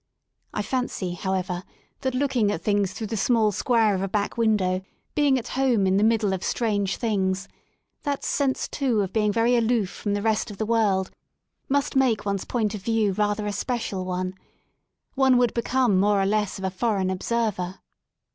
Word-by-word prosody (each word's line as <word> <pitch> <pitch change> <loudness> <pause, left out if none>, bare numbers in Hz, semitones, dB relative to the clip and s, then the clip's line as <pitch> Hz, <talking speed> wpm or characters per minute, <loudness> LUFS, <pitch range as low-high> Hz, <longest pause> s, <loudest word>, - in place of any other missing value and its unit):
I 210 - -2
fancy, 210 -7 -2
however, 185 0 -2 0.4
that 260 -1 -2
looking 255 -6 +1
at 165 -4 -4
things 205 -2 +1
through 220 +4 -5
the 220 +2 -3
small 220 0 +2
square 220 +1 +2
of 190 - -1
a 195 - -1
back 200 +1 -1
window, 205 -5 +1 0.3
being 285 -3 +3
at 245 -1 -5
home 250 -6 +2
in 190 0 +3
the 205 - +3
middle 220 -3 +2
of 190 - -3
strange 205 -4 0
things, 195 -4 -1 0.5
the 285 -2 -1
sense 275 -2 0
too 250 -7 0
of 190 -2 -3
being 210 -2 +2
very 230 +3 +3
aloof 230 -4 +1
from 205 -1 -2
the 205 - -2
rest 220 0 +1
of 205 - -8
the 220 - -1
world 210 -4 +1 0.6
must 285 +1 0
make 255 -6 +2
one's 200 -1 -1
point 220 -4 -1
ot 210 - -5
view 220 -1 +1
rather 210 +1 0
a 205 - -1
special 225 -6 -2
one. 185 0 -3 0.8
One 265 -2 +4
would 245 -2 +2
become 240 -4 +2
more 205 +1 +3
or 195 - +2
less 210 0 0
of 190 - -8
a 190 - -1
foreign 195 -2 0
observer. 190 -2 -1
210 Hz, 185 wpm, -25 LUFS, 195-235 Hz, 0.8 s, One